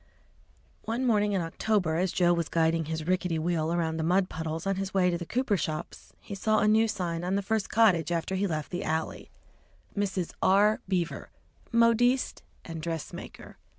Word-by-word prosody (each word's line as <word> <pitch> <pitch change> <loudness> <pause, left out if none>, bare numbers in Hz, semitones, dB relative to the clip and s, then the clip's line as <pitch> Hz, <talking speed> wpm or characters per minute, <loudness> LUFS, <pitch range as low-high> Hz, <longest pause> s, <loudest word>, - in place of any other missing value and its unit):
One 235 +4 -1
morning 210 -3 +2
in 190 - +1
October, 175 +1 0
as 180 +1 +1
Joe 175 -1 +3
was 170 -2 -1
guiding 165 0 +1
his 160 0 -4
rickety 180 -1 0
wheel 160 0 0
around 165 -2 0
the 160 - -1
mud 185 +3 +2
puddles 160 +1 -4
on 195 -1 0
his 195 0 -4
way 180 -2 +3
to 170 - -1
the 170 - -6
cooper 245 -4 +1
shops, 155 0 -5
he 210 - -9
saw 215 +2 +1
a 210 - +3
new 220 +1 +4
sign 175 -5 -3
on 185 +2 0
the 200 - 0
first 220 +1 -1
cottage 185 -8 +3
after 170 +2 -1
he 195 +1 0
left 155 -4 -3
the 180 +1 -3
alley 160 +1 -3 0.7
"Mrs. 190 -4 -1
R. 205 +3 +4
Beaver, 180 -3 -2 0.4
Modiste 235 +2 +3 0.2
& 165 -1 -6
Dress 165 -1 -4
Maker." - - -10
180 Hz, 185 wpm, -28 LUFS, 165-205 Hz, 0.7 s, new